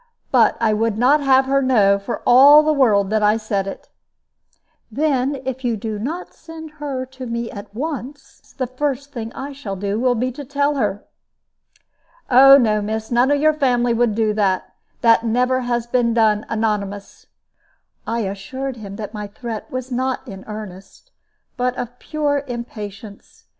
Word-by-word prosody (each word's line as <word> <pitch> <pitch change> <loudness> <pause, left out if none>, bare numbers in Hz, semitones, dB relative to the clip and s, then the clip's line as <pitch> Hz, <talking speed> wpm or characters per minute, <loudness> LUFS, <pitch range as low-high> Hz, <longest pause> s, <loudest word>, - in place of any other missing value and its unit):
But - - +4
I 220 -2 +2
would 220 0 0
not 270 +6 +4
have 265 -1 +4
her 275 +1 +2
know 205 -7 +3
for 200 +4 -5
all 285 +5 +8
the 310 0 +2
world 210 -8 +3
that 215 0 +1
I 210 +1 +3
said 205 -3 -2
it." 195 - -8 1.0
"Then 275 +1 0
if 265 0 -4
you 235 -2 0
do 215 0 -5
not 320 - -5
send 320 -1 -11
her 270 -3 -3
to 260 0 -9
me 235 0 -4
at 200 0 -9
once, 285 0 -7
the 255 - -1
first 280 +2 -3
thing 230 -3 -5
I 275 +2 -6
shall 225 -8 -6
do 200 +2 -2
will 250 0 +2
be 250 +3 -1
to 285 +4 -8
tell 285 +2 0
her." 205 -7 -2 1.3
"Oh 270 +2 +9
no, 215 -5 +2
miss, 220 +2 -4
none 245 +2 +3
of 290 0 +2
your 310 +1 +4
family 245 -5 +1
would 230 -2 +1
do 220 -1 +1
that; 195 -3 0 0.3
that 230 -1 +4
never 250 +3 +1
has 240 -2 -2
been 240 -1 +1
done 215 -2 +2
anonymous." 205 -3 -3 0.8
I 230 +1 -1
assured 240 +7 -5
him 200 -3 -8
that 210 0 -7
my 210 -1 -5
threat 220 +1 -7
was 255 0 -5
not 260 +2 -2
in 195 -3 -9
earnest, 200 -3 -10 0.5
but 250 0 0
of 245 +1 -6
pure 290 -2 -1
impatience. 215 -3 -9
240 Hz, 170 wpm, -20 LUFS, 215-265 Hz, 1.3 s, Oh